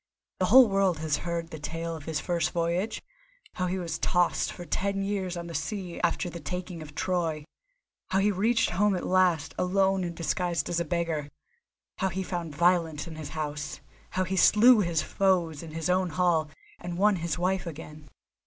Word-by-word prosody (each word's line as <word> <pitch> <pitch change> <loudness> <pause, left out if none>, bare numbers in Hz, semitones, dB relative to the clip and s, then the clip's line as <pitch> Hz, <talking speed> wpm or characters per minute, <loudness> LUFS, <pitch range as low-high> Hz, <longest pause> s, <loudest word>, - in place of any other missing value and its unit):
The 185 - +2
whole 250 +4 +8
world 195 -4 +2
has 155 -1 0
heard 170 0 -4
the 155 - -7
tale 165 +2 -4
of 150 -2 -10
his 160 -1 -2
first 175 -2 0
voyage, 175 +6 -1 0.5
how 185 - -1
he 185 +1 -1
was 170 -3 -4
tossed 175 -1 +1
for 175 - -9
ten 195 +2 -1
years 190 -3 -2
on 170 - -5
the 170 - -7
sea 175 +3 -4
after 175 +1 0
the 170 0 -6
taking 180 +3 -5
of 150 -1 -10
Troy, 165 -5 -1 0.6
how 190 - +1
he 200 +2 +3
reached 220 +4 +2
home 205 +1 +2
at 180 - -3
last, 180 -4 +2
alone 190 +1 +2
and 170 -1 -4
disguised 170 -1 -1
as 175 - 0
a 170 - -1
beggar; 165 -3 -2 0.7
how 190 - +1
he 190 +2 -3
found 170 -5 -4
violence 165 -2 +2
in 165 -2 -8
his 155 -1 -7
house, 150 -1 -4 0.3
how 185 - 0
he 185 +1 -2
slew 220 +5 +6
his 170 -5 +1
foes 175 -6 +1
in 165 - -9
his 160 0 -3
own 180 0 +2
hall, 160 -2 +1 0.3
and 175 0 -5
won 205 +1 +4
his 170 -1 -2
wife 185 0 0
again. 150 -1 -9
175 Hz, 190 wpm, -28 LUFS, 160-185 Hz, 0.7 s, whole